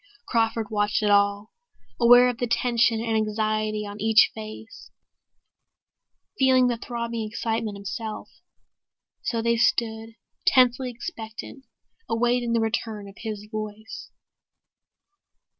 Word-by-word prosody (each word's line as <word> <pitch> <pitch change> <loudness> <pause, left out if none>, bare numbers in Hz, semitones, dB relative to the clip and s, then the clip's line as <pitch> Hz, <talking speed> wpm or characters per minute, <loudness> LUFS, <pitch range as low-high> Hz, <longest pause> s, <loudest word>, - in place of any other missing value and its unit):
Crawford 225 -2 0
watched 210 0 0
it 205 - +2
all, 200 +1 +2 0.5
aware 245 +1 +7
of 245 - -5
the 245 - -1
tension 235 -1 +2
and 225 -1 -1
anxiety 215 0 -1
on 205 0 -8
each 220 -1 +5
face, 220 0 -10 1.5
feeling 260 -1 +5
the 240 -1 0
throbbing 235 -1 -4
excitement 220 -1 -3
himself. 215 +2 -6 0.9
So 230 -1 -2
they 235 0 +2
stood, 225 -1 0 0.3
tensely 255 -4 +4
expectant, 240 0 -8 0.4
awaiting 240 +1 +1
the 230 - +2
return 220 -2 -2
of 195 - -12
his 215 -2 -6
voice.... 215 0 -7
225 Hz, 110 wpm, -25 LUFS, 215-235 Hz, 1.5 s, aware